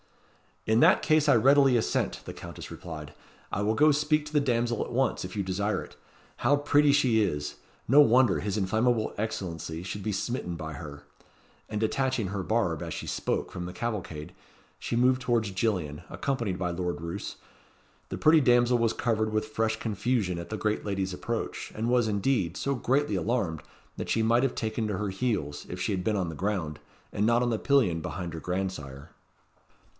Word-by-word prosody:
"In 110 +1 +3
that - - +5
case 155 -1 +3
I 140 - +7
readily 135 +2 +5
assent," 110 - -1
the - - -6
Countess - - -9
replied. 75 -3 -8 0.4
"I 100 - -1
will 110 +2 +1
go 150 +5 +5
speak 150 +1 +1
to 150 - -10
the 150 - +4
damsel 120 -4 0
at - - -8
once, 130 +2 +1
if 90 +1 -7
you 100 - -1
desire 100 +3 -1
it. - - -14 0.4
How 145 - +3
pretty 145 0 +4
she 130 -6 +3
is! 75 -7 -1 0.3
No 135 +5 +6
wonder 130 -2 +5
his 105 0 -2
inflammable 110 +3 +1
Excellency 85 -6 -4
should 100 +2 -5
be 105 - -2
smitten 100 -3 -3
by 80 -2 -6
her." 75 0 -9 0.7
And 105 - -2
detaching 130 0 0
her 100 +1 -3
barb, 95 -6 0
as - - -4
she - - -5
spoke, - - -2
from 90 - -5
the 90 - -6
cavalcade, 95 -10 -4 0.5
she - - -3
moved 125 +2 +3
towards 120 -5 +1
Gillian, 90 -7 -1
accompanied 115 -9 -2
by 90 -1 -1
Lord 85 -3 -3
Roos. 85 +4 -5 0.7
The - - -4
pretty 155 0 +5
damsel 120 -1 +4
was 115 -1 +2
covered 110 -2 0
with 110 0 -1
fresh 110 0 0
confusion 110 -4 -1
at 85 - -7
the 110 - -3
great 105 0 -1
lady's 95 -2 -2
approach; 115 +5 -4
and 115 +2 -1
was, 120 -2 +3
indeed, 100 - 0
so 140 - -1
greatly 130 -1 +1
alarmed, 95 -5 -1 0.4
that - - -5
she 110 - +2
might 120 +3 +3
have 135 - 0
taken 110 0 -2
to 105 -3 -2
her 105 0 -2
heels, 95 - -2
if - - -6
she - - -1
had 90 -2 -1
been 105 +3 +1
on 90 -3 -1
the 80 - -6
ground, 90 -5 -2 0.3
and 105 - 0
not 120 +2 +3
on 120 - +1
the 110 - 0
pillion 120 -13 +3
behind 85 +1 -5
her 80 - -5
grandsire. 90 -7 -4
110 Hz, 190 wpm, -28 LUFS, 90-120 Hz, 0.7 s, I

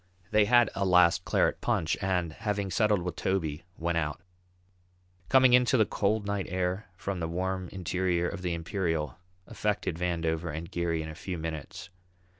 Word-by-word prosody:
They 105 -1 +5
had 120 0 +5
a 100 - -1
last 90 -2 +4
claret - - +1
punch 80 - +1
and, 90 -4 0
having 100 0 -2
settled 105 -2 +2
with 90 -1 -4
Toby, 85 -5 -2
went 85 0 0
out. 75 -3 -3 1.1
Coming 130 -2 +6
out - - +10
into 125 +1 +2
the 110 - +5
cold 105 +1 0
night 100 -1 -2
air 90 +2 -2
from 100 -1 -4
the 80 - -2
warm 95 +1 -2
interior 90 -1 -1
of 100 0 -5
the 90 -2 -1
Imperial 80 - -2 0.3
affected 105 -6 -2
Vandover 85 -2 -1
and 80 +3 -6
Geary 85 -2 -1
in 80 - -6
a - - -6
few 90 +3 -5
minutes. 80 +1 -6
90 Hz, 170 wpm, -29 LUFS, 85-100 Hz, 1.1 s, out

